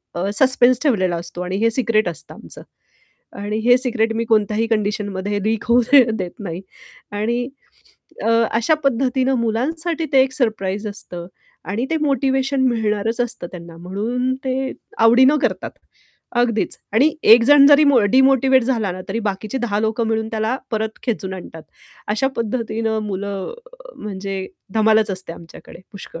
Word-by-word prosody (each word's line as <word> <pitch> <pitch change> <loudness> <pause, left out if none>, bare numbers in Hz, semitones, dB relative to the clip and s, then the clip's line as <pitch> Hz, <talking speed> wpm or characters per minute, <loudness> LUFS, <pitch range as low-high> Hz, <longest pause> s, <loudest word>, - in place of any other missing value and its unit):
अ, 185 +3 -1
suspense 255 -1 +4
ठेवलेला 190 - +1
असतो 170 +1 -5
आणि 180 +1 -3
हे 230 +2 +2
सिक्रेट 220 -5 +1
असतं 160 -1 -10
आमचं. - - -12 0.8
आणि 210 +1 -3
हे 245 0 +6
सिक्रेट 230 -3 0
मी 230 - -1
कोणत्याही 220 0 +1
कंडिशनमध्ये 205 -2 -2
लीक 220 0 -1
होऊ 240 - +6 0.4
देत 180 -2 -3
नाही. 175 -2 -5 0.5
आणि 235 +4 -1 0.7
अ, 225 - +1 0.3
अशा 245 +7 +2
पद्धतीने 260 0 +1
मुलांसाठी 315 +9 -1
ते 265 - +6
एक 260 0 -2
सरप्राईज 210 -5 -2
असतं 175 -4 -8 0.4
आणि 230 +5 -1
ते 325 - +1
मोटिव्हेशन 270 -1 0
मिळणारच 225 0 -1
असतं 240 -7 -3
त्यांना 170 -2 -10
म्हणून 225 +9 -2
ते 265 0 -2 0.3
आवडीनं 255 +6 +5
करतात. - - -1 0.7
अगदीच, 230 -3 0 0.2
आणि 275 +9 +3
1 230 +2 +7
जण 285 +1 +7
जरी 290 +1 +7
मो 280 -4 +5
डिमोटिव्हेट 265 -1 +4
झाला 230 -7 -1
ना 185 - -8
तरी 225 +4 -2
बाकीची 200 +5 -4
10 215 -4 -1
लोकं 220 +1 -1
मिळून 220 0 -1
त्याला 220 +3 -1 0.2
परत 220 0 -2
खेचून 195 -6 -3
आणतात. 165 -3 -10 0.5
अशा 215 +6 +1
पद्धतीनं 225 -1 -2
मुलं 200 0 -4 0.2
अ, - - -15
म्हणजे 195 -2 -5 0.3
धमालच 220 -1 +3
असते 185 -2 -7
आमच्याकडे 170 0 -14
पुष्कळ. 190 -4 -10
225 Hz, 150 wpm, -20 LUFS, 200-255 Hz, 0.8 s, 1